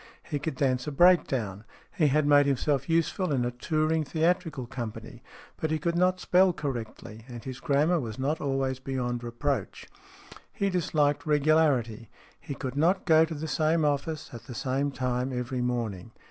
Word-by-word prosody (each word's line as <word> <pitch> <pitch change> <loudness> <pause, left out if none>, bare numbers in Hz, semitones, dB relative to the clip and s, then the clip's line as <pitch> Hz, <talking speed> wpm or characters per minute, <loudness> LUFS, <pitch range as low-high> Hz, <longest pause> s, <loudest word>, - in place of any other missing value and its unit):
He 150 -3 -3
could 150 0 -3
dance 130 -1 0
a - - -2
breakdown. 135 - +3 0.3
He 160 -6 +3
had 150 +2 +2
made 145 -1 +5
himself 140 +1 0
useful 165 +2 +1
in 125 -3 +1
a 120 - -1
touring 155 +5 0
theatrical 160 -2 0
company. 120 -3 -7 0.4
But 160 - -2
he 155 - +1
could 170 +1 -1
not 185 +1 +2
spell 185 +1 +4
correctly, 120 -6 -6
and 120 -3 -9
his 130 -1 -7
grammar 155 +3 +2
was 115 -6 -5
not 145 +5 -1
always 135 -2 -1
beyond 125 -2 -3
reproach. 120 -1 -3 0.6
He 200 -1 -1
disliked 150 -4 0
regularity. 145 -7 +2 0.3
He 140 - -7
could 130 +1 -5
not 175 +6 +2
go 160 -2 +6
to 160 0 -6
the 155 +2 -5
same 155 +1 +1
office 150 +2 -2
at 115 0 -9
the 125 - -8
same 135 +3 -1
time 125 -1 -2
every 125 0 -3
morning. 115 -5 -3
140 Hz, 170 wpm, -28 LUFS, 125-160 Hz, 0.6 s, go